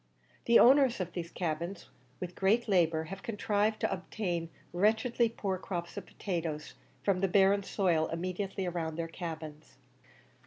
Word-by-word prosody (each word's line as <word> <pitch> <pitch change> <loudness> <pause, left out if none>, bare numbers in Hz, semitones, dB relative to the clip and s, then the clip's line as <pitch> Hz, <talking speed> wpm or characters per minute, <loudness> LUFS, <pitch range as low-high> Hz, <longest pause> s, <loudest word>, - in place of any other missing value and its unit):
The 235 - +6
owners 265 -2 +6
of 185 - -3
these 170 -2 -4
cabins, 170 +2 -4 0.3
with 180 -1 -5
great 215 +6 +2
labour, 165 -5 +3
have 190 +5 -8
contrived 210 -1 0
to - - +1
obtain 175 -3 -3 0.2
wretchedly 220 +5 +2
poor 195 -4 -3
crops 175 -2 -5
of - - -7
potatoes 165 -5 -4 0.3
from 195 -2 +2
the 195 - +2
barren 195 +1 +4
soil 175 -5 +1
immediately 185 +3 -3
round 165 -2 -3
their 165 -1 -2
cabins. 160 -3 -7
185 Hz, 145 wpm, -31 LUFS, 170-205 Hz, 0.3 s, The